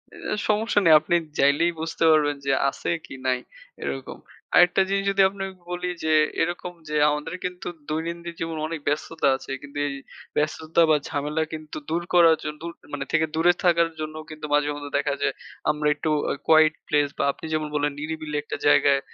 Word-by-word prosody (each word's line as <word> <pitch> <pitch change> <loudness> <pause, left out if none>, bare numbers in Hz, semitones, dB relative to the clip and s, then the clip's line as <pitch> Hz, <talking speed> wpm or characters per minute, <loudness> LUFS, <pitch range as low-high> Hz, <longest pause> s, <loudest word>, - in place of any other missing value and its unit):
এ - - -4
সমস্যা 215 0 +2
নেই। 165 - +8
আপনি 165 +3 0 0.2
যাইলেই 145 +5 +4
বুঝতে 165 +1 -2
পারবেন 150 -2 +3
যে, 135 - +2 0.2
আছে - - -5 0.2
কি - - -10
নাই 130 -1 +2 0.4
এরকম। 70 -1 -5 0.4
আরেকটা 180 +2 +6
জিনিস 195 0 +1
যদি 195 0 +2
আপনাকে 195 -1 -6 0.2
বলি 180 0 -3 0.2
যে, 160 0 +2 0.3
এরকম 175 +1 -2 0.2
যে 150 - -2
আমাদের 150 +2 -3
কিন্তু 180 0 -5 0.2
দৈনন্দিন 170 +2 -3
জীবনে 165 -1 -3
অনেক 165 0 -4
ব্যস্ততা 155 +2 0
আছে। 135 - -8
কিন্তু 145 0 -10
এই 140 - -3 0.4
ব্যস্ততা 155 +2 +1
বা 155 - +6
ঝামেলা 150 +2 -1
কিন্তু 155 -1 -7
দূর 165 +2 0
করার 170 -2 +7
জন 150 - -3
দূর 170 +1 -5 0.2
মানে 140 -1 -3
থেকে 160 -1 +3
দূরে 170 +2 +4
থাকার 170 -2 +4
জন্য 155 0 -5
কিন্তু 155 -1 -7
মাঝে 145 0 +3
মধ্যে 145 0 -7
দেখা 145 0 0
যায় - - +1 0.4
আমরা 150 0 -1
একটু 145 +2 -3 0.2
আ - - +1
quiet 155 -1 +6
place 145 -1 +2
বা - - 0
আপনি - - -11
যেমন 155 -1 0
বললেন 145 0 +1
নিরিবিলি 155 0 -4
একটা - - -5
জায়গায় 145 -1 +5
155 Hz, 185 wpm, -24 LUFS, 145-170 Hz, 0.4 s, নেই